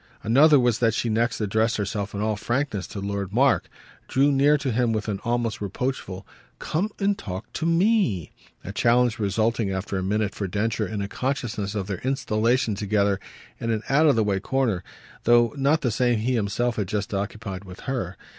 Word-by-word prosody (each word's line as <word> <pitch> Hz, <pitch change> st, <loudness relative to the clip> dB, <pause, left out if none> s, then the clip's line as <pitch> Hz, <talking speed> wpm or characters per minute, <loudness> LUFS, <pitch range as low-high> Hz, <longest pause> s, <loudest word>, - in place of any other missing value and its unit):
Another 140 Hz, +6 st, +6 dB
was 120 Hz, -3 st, +2 dB
that 115 Hz, -2 st, +2 dB
she 120 Hz, -, -1 dB
next 115 Hz, +2 st, 0 dB
addressed 110 Hz, +3 st, +1 dB
herself 100 Hz, 0 st, -3 dB
in 100 Hz, -, -2 dB
all 110 Hz, 0 st, 0 dB
frankness 120 Hz, -3 st, -2 dB
to 100 Hz, -, -7 dB
Lord 100 Hz, -1 st, -3 dB
Mark, 130 Hz, +4 st, +2 dB, 0.4 s
drew 140 Hz, +2 st, +3 dB
near 145 Hz, +2 st, +4 dB
to 140 Hz, -3 st, -2 dB
him 120 Hz, 0 st, +1 dB
with 110 Hz, 0 st, -2 dB
an 100 Hz, -2 st, -2 dB
almost 120 Hz, -2 st, -1 dB
reproachful 100 Hz, -2 st, -4 dB, 0.3 s
"Come 180 Hz, +7 st, -1 dB
and 200 Hz, 0 st, +1 dB
talk 95 Hz, -, -7 dB
to 160 Hz, -, -2 dB
ME!" 170 Hz, -, +2 dB, 0.3 s
a 100 Hz, -, -6 dB
challenge 120 Hz, +2 st, +2 dB
resulting 110 Hz, +1 st, 0 dB
after 95 Hz, 0 st, -2 dB
a -, -, -3 dB
minute 105 Hz, +1 st, 0 dB
for 100 Hz, -, -3 dB
Densher 105 Hz, +2 st, -1 dB
in 100 Hz, +1 st, -3 dB
a -, -, -3 dB
consciousness 110 Hz, -5 st, -3 dB
of 100 Hz, -2 st, -2 dB
their 95 Hz, -3 st, -4 dB
installation 125 Hz, -2 st, +1 dB
together 100 Hz, -1 st, +1 dB, 0.4 s
in 115 Hz, -, -3 dB
an 110 Hz, -1 st, 0 dB
out 150 Hz, +4 st, +4 dB
of 145 Hz, -, +5 dB
the 110 Hz, -, +3 dB
way 100 Hz, -2 st, 0 dB
corner, 115 Hz, -5 st, 0 dB, 0.4 s
though 120 Hz, 0 st, +5 dB
not 145 Hz, +3 st, +2 dB
the 125 Hz, -, 0 dB
same 120 Hz, +1 st, +2 dB
he 120 Hz, +4 st, 0 dB
himself 115 Hz, +2 st, 0 dB
had 105 Hz, -3 st, -1 dB
just 105 Hz, 0 st, -3 dB
occupied 100 Hz, -1 st, -4 dB
with 90 Hz, -1 st, -11 dB
her. 115 Hz, -9 st, -3 dB
110 Hz, 195 wpm, -24 LUFS, 100-125 Hz, 0.4 s, Another